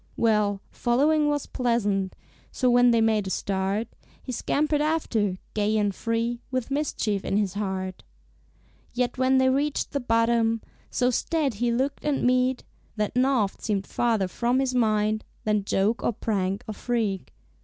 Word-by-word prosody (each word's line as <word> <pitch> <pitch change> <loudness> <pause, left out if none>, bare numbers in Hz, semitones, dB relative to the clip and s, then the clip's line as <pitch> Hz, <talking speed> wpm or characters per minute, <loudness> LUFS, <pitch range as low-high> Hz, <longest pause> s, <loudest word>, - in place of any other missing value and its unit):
Well, 210 -3 +2
following 295 +5 +2
was 290 -1 0
pleasant, 205 -6 0 0.4
So, 255 -2 +1
when 245 0 +6
they 230 -1 +4
made 215 -3 +2
a - - -2
start, 195 +3 -1 0.3
He - - -7
scampered 295 +4 0
after, 235 - 0 0.2
gay 215 +1 +1
and 205 -2 +1
free, 230 +3 -2
With 255 0 -3
mischief 230 -8 -1
in 195 - 0
his 200 -3 0
heart. 190 -2 -4 0.9
Yet 250 +1 -1
when 260 +1 +4
they 260 0 +4
reached 285 +2 0
the 280 - -1
bottom, 230 -1 +2 0.3
So 250 0 +1
staid 295 +1 0
he 235 +3 0
looked 265 +4 -1
and 295 -2 0
meek, 255 +1 +2 0.3
That 210 +1 -2
naught 250 -6 +1
seemed 200 -3 -1
farther 225 -5 0
from 240 +7 0
his 265 -1 0
mind 215 -2 +1 0.2
Than 210 -2 0
joke 205 +4 +1
or - - +1
prank 195 -3 -2
or 215 - -4
freak. 215 -4 -2
230 Hz, 155 wpm, -26 LUFS, 205-255 Hz, 0.9 s, when